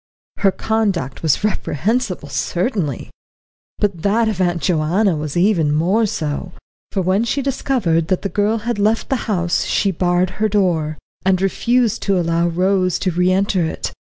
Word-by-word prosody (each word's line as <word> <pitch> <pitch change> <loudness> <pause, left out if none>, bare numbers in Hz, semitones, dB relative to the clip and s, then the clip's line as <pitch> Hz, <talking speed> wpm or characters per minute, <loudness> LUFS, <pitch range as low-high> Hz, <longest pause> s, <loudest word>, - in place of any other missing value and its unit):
Her 195 - +3
conduct 195 - -1
was 160 +3 +1
reprehensible 210 - -1
certainly. 155 - -2 0.7
But 195 -5 -1
that 220 +4 +2
of 205 -4 -1
Aunt 175 -1 +1
Joanna 175 +4 +1
was 150 +1 -4
even 175 -5 +3
more 185 +9 +2
so, 160 0 -3 0.4
for 190 - -1
when 190 +5 +2
she 275 +4 -1
discovered 235 - 0
that 185 - 0
the - - 0
girl 205 +4 0
had 240 -3 -1
left 215 +2 +1
the 270 - +2
house 175 -4 +1
she 200 - +1
barred 180 0 +1
her 215 - +3
door, 170 -7 0 0.3
and 185 -1 +2
refused 230 +4 +1
to 195 -2 +1
allow 170 0 +1
Rose 185 +1 +1
to 185 - -1
re 180 +2 +2
enter 195 -1 +1
it. 160 - -3
185 Hz, 160 wpm, -19 LUFS, 170-210 Hz, 0.7 s, Her